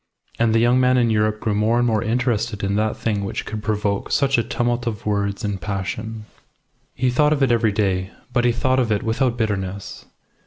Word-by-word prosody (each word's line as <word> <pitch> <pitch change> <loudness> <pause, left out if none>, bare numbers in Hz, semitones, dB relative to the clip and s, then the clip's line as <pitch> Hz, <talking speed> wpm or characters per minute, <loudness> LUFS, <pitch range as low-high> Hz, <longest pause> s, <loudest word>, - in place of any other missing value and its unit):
And 115 -1 +3
the - - +5
young 120 +2 +4
man 130 0 +4
in 120 -2 +3
Europe 105 0 +1
grew 110 -1 -1
more 110 +3 +2
and 120 - +2
more 110 -3 +1
interested 115 -2 -1
in 100 0 0
that 110 0 0
thing 105 -3 -1
which 100 - -4
could 110 0 -5
provoke 105 -1 -1
such 135 -3 +2
a - - +1
tumult 120 +1 -1
of 110 -3 -4
words 100 +1 -1
and 100 -2 -3
passion. 105 +3 -4 0.7
He 125 0 +1
thought 150 +4 +3
of 140 -2 +1
it 130 - +3
every 115 -2 +3
day; 95 -2 0 0.2
but 120 -1 +2
he 120 - +4
thought 130 +2 +1
of 120 -3 +1
it 105 - 0
without 120 +2 0
bitterness. 100 -3 -3
110 Hz, 210 wpm, -21 LUFS, 105-120 Hz, 0.7 s, the